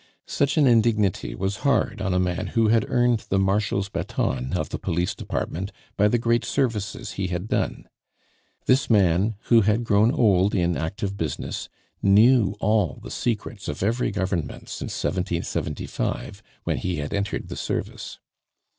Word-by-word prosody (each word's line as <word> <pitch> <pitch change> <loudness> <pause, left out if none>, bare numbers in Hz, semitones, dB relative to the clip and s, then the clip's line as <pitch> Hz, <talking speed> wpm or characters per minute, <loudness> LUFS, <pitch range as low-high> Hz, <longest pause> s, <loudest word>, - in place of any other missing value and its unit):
Such 140 +3 0
an 150 - +5
indignity 110 - +2
was 95 +8 -2
hard 120 -8 +1
on 95 0 0
a 90 - +2
man 90 -1 -1
who 110 -1 +4
had 115 -1 +2
earned 120 -2 +3
the 95 - +2
Marshal's 100 0 +1
baton 65 -9 -2
of - - -1
the - - -4
Police 85 +2 -1
Department 95 +4 -4 0.2
by 105 - +4
the 120 - +2
great 115 0 +1
services 105 -6 -2
he 95 +1 -2
had 90 +2 -3
done. - - -2 0.8
This 130 +2 +3
man, 100 0 +3
who 115 -1 +7
had 105 +3 +2
grown 110 +1 +4
old 100 -6 +3
in 90 -2 +1
active 95 +5 -3
business, 80 -6 -4 0.3
knew 105 +1 +5
all 105 -6 +1
the - - -8
secrets 110 -3 -3
of 75 +4 -3
every 115 +5 +1
Government 95 -4 -3
since - - -5
1775, 85 -4 -3 0.2
when - - -1
he 90 0 -2
had 75 -1 -4
entered 100 0 -2
the - - -5
service. - - -4
100 Hz, 155 wpm, -24 LUFS, 90-115 Hz, 0.8 s, who